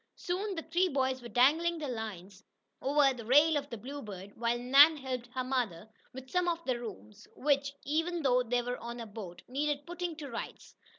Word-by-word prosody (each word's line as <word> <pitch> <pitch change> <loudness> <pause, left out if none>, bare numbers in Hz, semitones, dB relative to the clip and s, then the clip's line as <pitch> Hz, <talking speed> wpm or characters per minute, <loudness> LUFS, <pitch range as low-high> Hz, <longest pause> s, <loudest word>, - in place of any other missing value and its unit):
Soon 385 +3 -3
the 325 - -4
three 355 +3 +1
boys 260 -3 0
were 240 - -8
dangling 300 +9 +3
their 305 -2 -4
lines 200 -3 -7 0.4
over 275 0 +4
the 240 -2 -8
rail 295 +7 +5
of 285 -1 -2
the 235 - -5
Bluebird, 210 -6 -8
while 235 +1 0
Nan 280 +6 +7
helped 255 -3 -4
her 255 - 0
mother 235 -8 -2 0.2
with 260 0 -9
some 360 -1 +1
of 335 -1 -1
the 255 -2 0
rooms, 180 - -9
which, 280 0 +1
even 325 +4 0
though 250 -2 +4
they 245 0 0
were 245 +1 -3
on 235 +1 -6
a 230 - -5
boat, 200 -5 -9
needed 290 +2 -1
"putting 350 -1 -4
to 300 -2 -7
rights." 235 - -7
260 Hz, 195 wpm, -31 LUFS, 235-300 Hz, 0.4 s, Nan